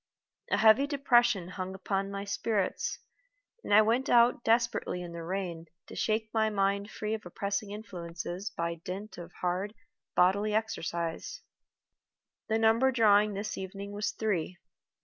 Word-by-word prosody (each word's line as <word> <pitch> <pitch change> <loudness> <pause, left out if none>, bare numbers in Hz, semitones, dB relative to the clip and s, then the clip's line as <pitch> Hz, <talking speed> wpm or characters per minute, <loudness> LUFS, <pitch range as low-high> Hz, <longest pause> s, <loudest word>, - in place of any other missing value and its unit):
A - - +2
heavy 220 +6 +6
depression 240 - +3
hung 190 0 -5
upon 195 +1 -2
my 200 0 -4
spirits, 200 0 -1 0.7
and - - -6
I 215 +1 +8
went 235 +5 +1
out 240 0 +5
desperately 230 -5 +1
in 170 -1 -8
the 170 - -6
rain 170 -1 -4 0.2
to - - -11
shake 220 0 -1
my 220 -1 +2
mind 200 0 0
free 215 0 -3
of 220 - -4
oppressing 200 +3 -3
influences 180 -2 -6
by 170 -2 -4
dint 195 +2 -6
of 175 0 -9
hard 185 +5 -2 0.4
bodily 200 +4 +3
exercise. 170 -6 -3 1.1
The 220 - +1
number 225 +4 +4
drawn 210 -3 +4
this 200 +1 -4
evening 195 +1 -6
was 205 +1 -2
Three. 185 -5 -2
200 Hz, 145 wpm, -30 LUFS, 185-220 Hz, 1.1 s, I